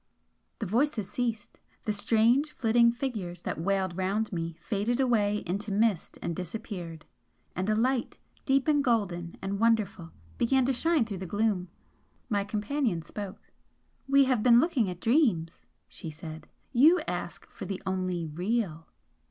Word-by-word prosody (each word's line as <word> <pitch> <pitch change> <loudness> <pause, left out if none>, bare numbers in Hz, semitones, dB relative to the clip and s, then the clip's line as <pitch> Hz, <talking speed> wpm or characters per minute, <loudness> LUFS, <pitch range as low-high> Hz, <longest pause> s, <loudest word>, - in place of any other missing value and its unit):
The 220 - -3
voices 230 0 0
ceased 230 -4 -3 0.2
the 215 - -1
strange 235 +8 +3
flitting 235 0 +4
figures 210 -9 -4
that - - -3
wailed 190 -1 0
round 195 +4 -1
me 165 -1 -3
faded 225 +4 -1
away 210 -5 +2
into 200 +4 -3
mist, 210 -3 +1
and 170 - -2
disappeared 180 -3 -6 0.5
and 185 +3 -1
a 215 - +3
light, 245 +2 0 0.3
deep 270 0 +2
and 295 -2 +3
golden 190 -9 0
and 195 +1 -2
wonderful, 215 -7 +1 0.3
began 260 +2 +3
to 270 - +2
shine 320 0 +2
through 200 -4 -5
the 190 - -5
gloom. 205 -2 0 0.6
My 205 -2 +1
companion 210 - -1
spoke. 200 +3 -8 0.6
"We 275 0 +6
have 255 -4 +2
been 235 0 +7
looking 260 - +2
at 180 -1 -7
dreams," 220 - +1 0.2
she 165 - -8
said 160 0 -9 0.3
"You 310 +9 +6
ask - - -5
for - - -8
the 195 -1 -4
only 185 -2 -1
Real!" 175 0 -2
210 Hz, 150 wpm, -29 LUFS, 185-240 Hz, 0.6 s, been